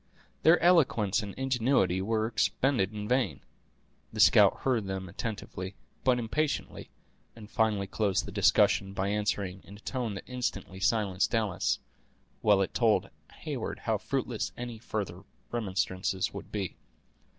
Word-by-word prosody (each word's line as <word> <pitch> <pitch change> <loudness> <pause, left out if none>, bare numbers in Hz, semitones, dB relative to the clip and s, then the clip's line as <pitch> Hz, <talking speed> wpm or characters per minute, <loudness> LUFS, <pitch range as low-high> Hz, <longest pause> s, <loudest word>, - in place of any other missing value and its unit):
Their 165 +2 +6
eloquence 125 - +4
and 100 -2 -7
ingenuity 125 -8 +1
were 110 +2 0
expended 115 -2 +1
in 105 -1 -5
vain. 120 - 0 0.7
The - - -7
scout - - +6
heard 120 -7 +1
them 95 -1 -4
attentively, 95 -1 -5 0.3
but 125 -1 +4
impatiently, 140 +6 -2 0.5
and 110 -2 -11
finally 110 -4 +1
closed 100 -1 0
the - - -7
discussion, 95 -1 +3
by 100 0 -1
answering, 100 -2 -1
in 100 - -12
a - - -13
tone 120 -2 -3
that 95 - -6
instantly 110 -7 -4
silenced 100 -2 +1
Alice, 110 -4 +1 0.6
while 100 -2 +4
it - - -5
told 115 -3 +2 0.3
Heyward - - -4
how - - 0
fruitless - - -2
any 120 -2 -6
further 100 -6 -4 0.3
remonstrances 95 -4 -1
would - - -8
be. 100 -4 -3
105 Hz, 140 wpm, -29 LUFS, 95-120 Hz, 0.7 s, Their